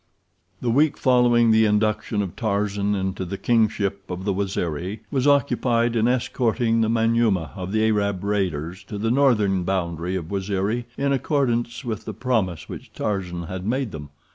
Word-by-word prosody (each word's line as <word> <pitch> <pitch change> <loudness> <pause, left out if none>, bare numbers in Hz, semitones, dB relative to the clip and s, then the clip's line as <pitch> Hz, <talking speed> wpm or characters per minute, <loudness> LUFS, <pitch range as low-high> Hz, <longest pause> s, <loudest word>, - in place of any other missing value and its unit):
The 120 - 0
week 145 +5 +3
following 120 -2 +4
the 110 0 +5
induction 105 0 +1
of 95 - -6
Tarzan 100 -2 0
into 95 -1 -2
the 95 +2 -5
kingship 105 -4 0
of 90 +1 -5
the 100 - +1
Waziri 95 0 -3
was 135 0 +1
occupied 120 -4 +2
in 115 0 +3
escorting 120 -2 +1
the 110 - +2
Manyuema 115 -8 +2
of 95 -1 -5
the 110 +1 +2
Arab 100 -3 0
raiders 95 -3 -2
to 105 - -6
the 115 +2 0
northern 110 -8 +3
boundary 90 -1 -2
of 85 -2 -5
Waziri 100 +4 -1
in 140 0 +1
accordance 125 -3 0
with 110 -4 -4
the - - -6
promise 105 -10 -1
which - - -9
Tarzan 90 -4 -3
had 90 +2 -6
made 125 +2 -1
them. 75 -4 -8
105 Hz, 165 wpm, -23 LUFS, 95-120 Hz, -, the